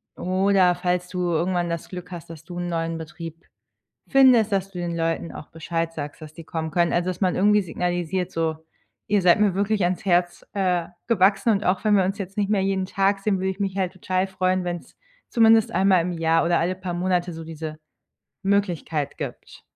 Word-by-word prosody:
oder 185 0 +3
falls 180 0 -1
du 180 - -4
irgendwann 175 +1 0
das 170 -1 -4
Glück 180 0 -8
hast, 170 -2 -8
dass 165 -2 -10
du 175 +1 -7
'n 175 - -3
neuen 165 -1 -2
Betrieb 165 +1 -9 0.6
findest, 255 -6 +5
dass 195 -1 0
du 185 - -9
den 170 -1 -3
Leuten 165 0 -1
auch 150 - -9
Bescheid 165 0 -3
sagst, 150 0 -7
dass 155 -1 -10
die 165 - -9
kommen 160 0 -3
können, 170 +1 +2
also, 175 +1 +1
dass 185 - -5
man 185 -2 +2
irgendwie 210 +2 +4
signalisiert 175 0 -2
so: 160 -1 -1 0.5
„Ihr 205 -1 +2
seid 175 +2 +5
mir 210 -3 +3
wirklich 200 0 +1
ans 180 0 -1
Herz, 175 -1 +1
äh, 180 -4 0 0.2
gewachsen 200 0 +3
und 205 -1 +1
auch 185 +2 +1
wenn 210 -1 +5
wir 190 - +4
uns 195 +2 -2
jetzt 195 0 -6
nicht 205 -1 0
mehr 205 -2 +2
jeden 190 -1 0
Tag 195 +1 +1
sehen, 195 0 0
würde 190 +1 0
ich 190 - -10
mich 195 -1 -2
halt 185 -2 -1
total 185 0 -1
freuen, 185 -1 0
wenn's 175 -1 -5 0.3
zumindest 225 -2 +5
einmal 185 0 +4
im 175 +1 -2
Jahr 165 0 +2
oder 170 0 +2
alle 180 +3 0
paar 185 -1 -5
Monate 180 0 0
so 165 0 -7
diese 155 -1 -7 0.6
Möglichkeit 180 -7 -1
gibt.“ - - -7
180 Hz, 205 wpm, -24 LUFS, 170-195 Hz, 0.6 s, findest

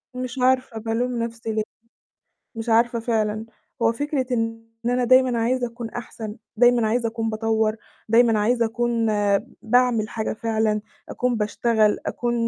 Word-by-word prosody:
مش 255 0 -5
عارفة 255 -2 +2
بالوم 230 +2 -1
نفسي 230 -1 -5
ليه. 215 0 0 0.9
مش 225 +1 -6
عارفة 235 +1 +3
فعلًا. 220 -1 -1 0.4
هو 225 0 +4
فكرة 285 +1 -2
إن 225 -1 -2 0.2
أنا 245 +1 +2
دايمًا 255 -1 +4
عايزة 245 +2 +1
أكون 235 -1 -7
أحسن، 220 -2 -7 0.2
دايمًا 240 0 +4
عايزة 235 +1 +1
أكون 225 0 -2
باطوّر، 220 0 0 0.3
دايمًا 230 0 +4
عايزة 235 +3 +2
أكون 235 0 0 0.6
باعمل 235 -2 +2
حاجة 220 -1 -3
فعلًا، 220 -1 0 0.3
أكون 250 -1 -1
باشتغل، 215 0 +2
أكون 240 -1 -1
230 Hz, 140 wpm, -23 LUFS, 220-245 Hz, 0.9 s, هو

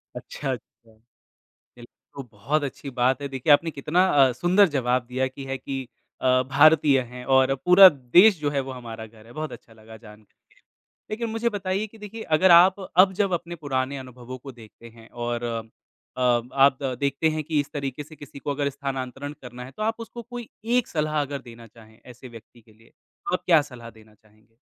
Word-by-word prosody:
अच्छा, - - -6
अच्छा। - - 0 1.2
बिल्क 120 0 -13 0.3
तो 140 - -6
बहुत 135 +9 -1
अच्छी 140 0 -6
बात 130 +3 +2
है। 140 - -3
देखिए 135 +2 +2
आपने 165 +3 +2
कितना 155 +6 +1 0.2
अ, - - -1
सुंदर 185 +9 +3
जवाब 125 -1 0
दिया 130 +2 -1
कि 130 +1 -11
ये 135 - -8
है 135 - -2
कि 130 -1 -6 0.3
अ, 130 0 +3
भारतीय 150 -2 +5
हैं 125 0 -9
और 130 +1 +4
पूरा 185 +2 +10 0.3
देश 195 -1 +7
जो 145 -1 -1
है 140 - 0
वो - - -5
हमारा 115 -3 -8
घर 110 0 -18
है, 115 - -15
बहुत 155 +2 -5
अच्छा 115 - -13
लगा 110 0 -14
जानकर 105 -1 -17
के। - - -57 0.8
लेकिन 230 +1 -3
मुझे 225 +1 -1
बताइए 200 0 -3
कि 225 - -18
देखिए 210 +1 -9 0.2
अगर 185 +1 +5
आप 180 +3 +7 0.2
अब 190 - -1
जब 200 -3 +1
अपने 175 0 -4
पुराने 140 -3 -3
अनुभवों 130 -1 -9
को 135 +2 -11
देखते 115 -1 -15
हैं 115 0 -17 0.2
और 120 0 -3
अ, 115 -1 -3 0.9
आप 135 0 +4 0.2
देखते 140 +3 +1
हैं 155 0 -3
कि 155 0 -1
इस 145 - -3
तरीके 140 0 -5
से 155 +2 -15
किसी 145 -1 -12
को 145 - -4
अगर 140 0 -1
स्थानांतरण 140 0 -5
करना 125 0 -9
है। 130 - -12
तो 215 - -6
आप 225 +1 0
उसको 235 +1 -8
कोई 240 0 -9 0.3
एक 250 - 0
सलाह 150 -1 -1
अगर 140 -1 -5
देना 115 0 -13
चाहें 110 0 -19
ऐसे 125 +1 -12
व्यक्ति 120 0 -15
के 110 0 -23
लिए, 115 +2 -23
तो - - -10
आप 180 - -1
क्या 165 -4 +5
सलाह 120 -2 -10
देना 110 -1 -19
चाहेंगे? 110 +1 -29
135 Hz, 205 wpm, -24 LUFS, 120-160 Hz, 1.2 s, पूरा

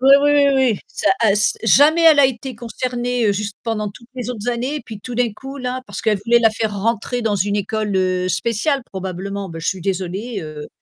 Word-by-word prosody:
Oui, 265 +1 +5
oui, 290 - +4
oui, 290 -1 +5
oui, 255 -6 +2
ça, 315 - -2
ass 210 -2 +3
jamais 295 - +5
elle 315 -3 +7
a - - +6
été 260 0 -5
concernée 245 -1 -1
juste 205 0 -4
pendant 215 -2 -2
toutes 235 +4 -15
les 250 -1 -4
autres 235 -1 -5
années, 250 +5 -2
puis 215 -2 -8
tout 245 +2 -7
d'un 240 -2 +1
coup 270 +6 -9
là, 255 0 -3
parce - - -5
qu'elle 210 -3 +1
voulait 235 +1 +5
la 225 -2 +4
faire 215 0 -2
rentrer 230 +3 -1
dans 220 -2 0
une 205 +1 0
école, 205 0 -1
heu, 185 -1 +1
spéciale 235 +7 0
probablement, 190 +1 -5
ben 165 -1 -8
je - - -5
suis 190 - -1
désolée, 195 +5 -3
heu, 155 -2 -8
225 Hz, 215 wpm, -19 LUFS, 200-250 Hz, -, elle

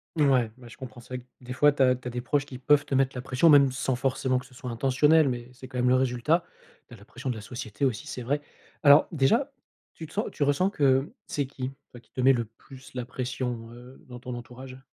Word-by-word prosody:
Ouais, 135 -7 +3
bah, 125 -2 -13
je 115 - -12
comprends. 130 -2 -10
C'est 125 +1 -8
vrai - - -3
que 125 - -18 0.2
des 125 - -5
fois, 145 +3 +5
tu 140 -1 +2
as 125 -1 +4
tu 125 0 -9
as - - -4
des 125 +1 -4
proches 140 +3 0
qui 135 -3 -9
peuvent 140 +3 +3
te 135 - -2
mettre 135 0 +2
la 125 - -4
pression, 130 +6 +3
même 140 -3 +7
sans 130 0 -1
forcément 130 0 0
que 125 - -12
ce 125 - -18
soit 125 0 -6
intentionnel, 140 +5 +3
mais 120 -1 -5
c'est 130 +1 -11
quand 130 - -7
même 125 0 +2
le 125 - +5
résultat. 130 +6 +1 0.4
Tu - - -15
as - - -15
la 100 - -16
pression 125 +4 -6
de 125 - -1
la 110 - -7
société 110 +2 -4
aussi, 115 -5 -2
c'est 125 - -6
vrai. 145 +5 -1 0.4
Alors 145 0 +7
déjà, 205 - +2 0.4
tu 160 - -9
te 155 - -16
sens 210 - -1
tu - - -13
ressens 145 +7 +2
que 135 -2 +2
c'est 145 - -1
qui? 130 -1 -6 0.2
Toi, 120 - -11
qui - - -28
te 130 - -3
met 135 +1 +6
le 120 -2 -1
plus 130 +4 -15
la 125 -2 -3
pression, 125 -2 -4
heu, 125 +2 -14
dans 125 -1 -9
ton 125 +1 -7
entourage? 130 +2 -10
130 Hz, 265 wpm, -27 LUFS, 125-140 Hz, 0.4 s, même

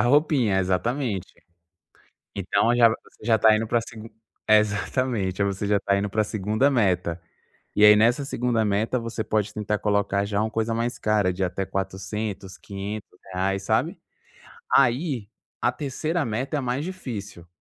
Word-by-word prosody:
roupinha. 125 -6 +3
Exatamente. 95 +3 -1 1.1
Então, 100 +4 +1
já 120 -1 +7
v 110 - 0
você - - -18
já 115 -1 +3
tá 110 0 +6
indo 115 - -2
para 120 +2 +2
a - - -1
segun 115 -1 -10 0.4
exatamente. 105 -1 +1
Aí, - - +2
você 100 +1 -2
já 100 0 +3
tá 100 0 +1
indo 100 +1 -1
para 110 - 0
a 105 - +3
2ª 110 +6 +1
meta. 90 - +1 0.6
E 105 - +3
aí 105 0 +9
nessa 115 +6 +3
2ª 120 -4 0
meta, 110 +4 0
você 115 -1 -4
pode 105 -1 -1
tentar 105 0 -2
colocar 100 -1 +1
já 100 0 -1
uma 110 - 0
coisa 115 +1 -1
mais 120 +1 -2
cara 105 -4 +1
de 95 +1 -2
até 95 +2 -2
400, 95 +1 -4
500 100 +2 -7 0.2
reais, 95 +2 -1
sabe. - - 0 0.8
Aí, 130 - +2 0.3
a 120 - +2
3ª 155 +4 -2
meta 125 +7 -2
é - - 0
mais 130 +2 -2
difícil. 110 - -7
110 Hz, 165 wpm, -24 LUFS, 100-120 Hz, 1.1 s, aí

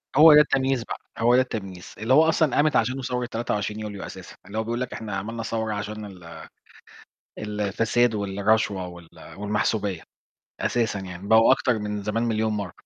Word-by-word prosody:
هو 155 +1 +9
ده 150 - +9
التمييز 135 -4 +1
بقى، - - -6 0.2
هو 120 +2 +4
ده 130 - +6
التمييز. 95 -8 -6
اللي 110 +5 +1
هو 160 +3 +6
أصلًا 160 -2 +2
قامت 145 -1 +3
عشانه 125 +4 +1
ثورة 125 0 -2
23 110 -3 -3
يوليو 105 -2 -6
أساسًا. - - -10
اللي 100 +3 -7
هو 110 - +1
بيقول 120 +2 -3
لك 125 - -4
إحنا 105 -3 -5
عملنا 115 +4 -4
ثورة 110 -1 -2
عشان 105 +1 -5
ال 85 -5 -11 0.9
الفساد 110 +3 0
والرشوة 100 -1 0
وال 85 -2 -12 0.3
والمحسوبية، 105 -2 -1 0.6
أساسًا 115 -4 0
يعني، 95 +1 -8
بقوا 110 +3 +6
أكتر 125 -4 0
من 105 -1 -4
زمان 110 +3 -1
مليون 110 -1 0
مرة. 100 -4 -3
110 Hz, 175 wpm, -24 LUFS, 100-120 Hz, 0.9 s, هو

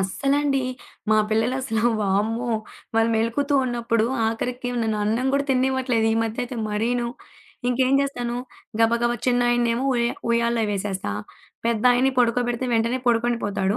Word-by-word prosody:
అస్సలండి, 275 +7 +1 0.5
మా 215 - +5
పిల్లలసలు 225 0 0 0.2
వామ్మో! 215 +4 0 0.5
వాళ్లు 225 0 +3
మెలుకువతో 235 +6 0
ఉన్నప్పుడు 235 -2 0 0.2
ఆఖరికి 245 +2 -3
నన్ను 220 -1 0
అన్నం 225 +5 0
కూడా 280 0 +1
తిననివ్వట్లేదు. 255 -3 +1
ఈ - - 0
మధ్య 225 0 -5
అయితే 245 0 -7
మరీను. 235 +3 0 0.6
ఇంకేం 255 +1 +2
జేస్తాను? 245 -4 -2 0.4
గబ 225 0 +4
గబ 240 0 +2
చిన్నాయన్నేమో 240 0 +2
ఉయ 240 -1 +1 0.3
ఉయాల్లో 235 0 +2
వేసేస్తా. 195 - -3 0.5
పెద్దాయన్ని 245 +3 +3
పడుకోబెడితే 245 +1 +1
వెంటనే 230 +3 +1
పడుకుండిపోతాడు. 230 -4 +1
235 Hz, 120 wpm, -23 LUFS, 225-250 Hz, 0.6 s, మా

